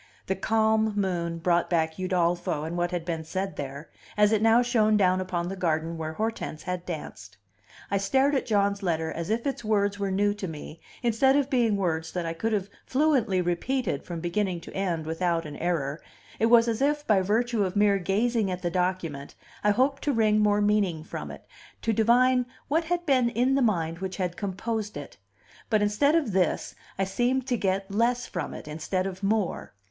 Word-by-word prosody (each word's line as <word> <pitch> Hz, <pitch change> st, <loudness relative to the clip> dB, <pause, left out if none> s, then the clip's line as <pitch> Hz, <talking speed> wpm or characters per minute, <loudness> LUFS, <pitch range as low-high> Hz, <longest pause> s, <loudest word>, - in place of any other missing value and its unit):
The 190 Hz, -, -1 dB
calm 220 Hz, +1 st, +2 dB
moon 175 Hz, -4 st, -1 dB
brought 170 Hz, +1 st, +1 dB
back 160 Hz, -2 st, 0 dB
Udolpho 175 Hz, -4 st, 0 dB
and 165 Hz, +2 st, -4 dB
what 175 Hz, 0 st, 0 dB
had 175 Hz, -2 st, -3 dB
been 165 Hz, -2 st, -3 dB
said 190 Hz, +4 st, -3 dB
there, 140 Hz, +2 st, -7 dB, 0.3 s
as 210 Hz, 0 st, +5 dB
it 215 Hz, -1 st, +2 dB
now 225 Hz, +2 st, +5 dB
shone 215 Hz, -3 st, +3 dB
down 185 Hz, -2 st, +3 dB
upon 175 Hz, -2 st, -2 dB
the 190 Hz, -, -4 dB
garden 165 Hz, -2 st, -1 dB
where 160 Hz, -1 st, -4 dB
Hortense 220 Hz, -5 st, -3 dB
had 180 Hz, -1 st, -4 dB
danced. 105 Hz, -, -7 dB, 0.5 s
I 200 Hz, -, +2 dB
stared 265 Hz, +8 st, +2 dB
at 270 Hz, -, 0 dB
John's 200 Hz, -2 st, +1 dB
letter 160 Hz, -3 st, -1 dB
as 165 Hz, 0 st, -5 dB
if 225 Hz, +2 st, -1 dB
its 275 Hz, -3 st, -2 dB
words 205 Hz, -1 st, +1 dB
were 200 Hz, -1 st, -1 dB
new 205 Hz, +2 st, +2 dB
to 205 Hz, -2 st, -5 dB
me, 160 Hz, 0 st, -9 dB, 0.2 s
instead 240 Hz, +3 st, +3 dB
of 285 Hz, -1 st, +1 dB
being 235 Hz, -5 st, +2 dB
words 160 Hz, -4 st, -2 dB
that 180 Hz, -2 st, -2 dB
I 165 Hz, -, -2 dB
could 220 Hz, +7 st, -2 dB
have 200 Hz, -3 st, 0 dB, 0.2 s
fluently 255 Hz, -10 st, +2 dB
repeated 175 Hz, -, -1 dB
from 170 Hz, -2 st, -6 dB
beginning 180 Hz, +1 st, -1 dB
to -, -, -11 dB
end 175 Hz, -5 st, -2 dB
without 165 Hz, +1 st, -1 dB
an 150 Hz, -, -7 dB
error; 155 Hz, -4 st, -2 dB, 0.4 s
it 225 Hz, -, +3 dB
was 235 Hz, 0 st, +6 dB
as 230 Hz, +1 st, -1 dB
if, 295 Hz, +1 st, +1 dB
by 205 Hz, -3 st, +4 dB
virtue 225 Hz, +3 st, +1 dB
of 185 Hz, 0 st, -2 dB
mere 205 Hz, -1 st, +4 dB
gazing 210 Hz, +3 st, +1 dB
at 180 Hz, 0 st, -4 dB
the 175 Hz, -, 0 dB
document, 180 Hz, -6 st, -2 dB, 0.3 s
I 210 Hz, -, +4 dB
hoped 260 Hz, +6 st, +2 dB
to 290 Hz, -, +2 dB
wring 215 Hz, -2 st, +3 dB
more 210 Hz, 0 st, +3 dB
meaning 205 Hz, -6 st, +1 dB
from -, -, -6 dB
it, -, -, -10 dB, 0.4 s
to 225 Hz, -, +1 dB
divine 245 Hz, +3 st, +3 dB, 0.2 s
what 325 Hz, +3 st, +1 dB
had 350 Hz, +1 st, -1 dB
been 255 Hz, -5 st, +3 dB
in 245 Hz, +4 st, +1 dB
the 275 Hz, -, +2 dB
mind 170 Hz, -8 st, 0 dB
which 190 Hz, 0 st, -4 dB
had 180 Hz, -3 st, -2 dB
composed 210 Hz, 0 st, -3 dB
it; 145 Hz, -, -9 dB, 0.5 s
but 215 Hz, -3 st, +3 dB
instead 210 Hz, +9 st, +3 dB
of 305 Hz, -10 st, +1 dB
this, 185 Hz, -3 st, 0 dB, 0.2 s
I 195 Hz, -, +1 dB
seemed 245 Hz, +7 st, 0 dB
to 250 Hz, -, 0 dB
get 195 Hz, -2 st, -1 dB
less 240 Hz, +4 st, +1 dB
from 175 Hz, -6 st, -5 dB
it, -, -, -9 dB
instead 160 Hz, +5 st, -2 dB
of 190 Hz, 0 st, -5 dB
more. 205 Hz, -2 st, -1 dB
195 Hz, 200 wpm, -27 LUFS, 175-225 Hz, 0.5 s, was